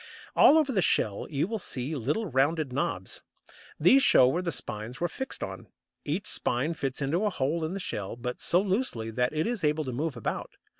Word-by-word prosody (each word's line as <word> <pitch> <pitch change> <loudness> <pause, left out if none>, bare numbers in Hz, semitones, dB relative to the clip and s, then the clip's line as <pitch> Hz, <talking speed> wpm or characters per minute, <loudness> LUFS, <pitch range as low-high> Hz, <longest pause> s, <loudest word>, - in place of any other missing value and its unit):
All 305 - +7
over 300 -4 +2
the 200 -6 +2
shell 105 - +1
you 145 +2 0
will 225 +1 -3
see 140 -3 -3
little 150 - -1
rounded 145 -1 +1
knobs. 95 -8 -2 0.6
These 240 - +6
show 130 - +6
where 165 +8 +1
the 175 -2 -2
spines 120 -2 -4
were 175 - +1
fixed 265 +10 -5
on; - - -7 0.4
each 170 +7 -2
spine 145 -3 0
fits 135 -2 -3
into 165 +9 0
a 210 - +2
hole 160 -1 -1
in 160 +4 -2
the - - -3
shell, 105 - -4
but 125 +1 -5
so 175 - +3
loosely 190 - -1
that 125 +2 0
it 155 +1 -1
is 235 -5 -2
able 150 +1 +2
to 130 -3 -4
move 145 +1 -2
about. 115 - -4
150 Hz, 205 wpm, -28 LUFS, 125-180 Hz, 0.6 s, All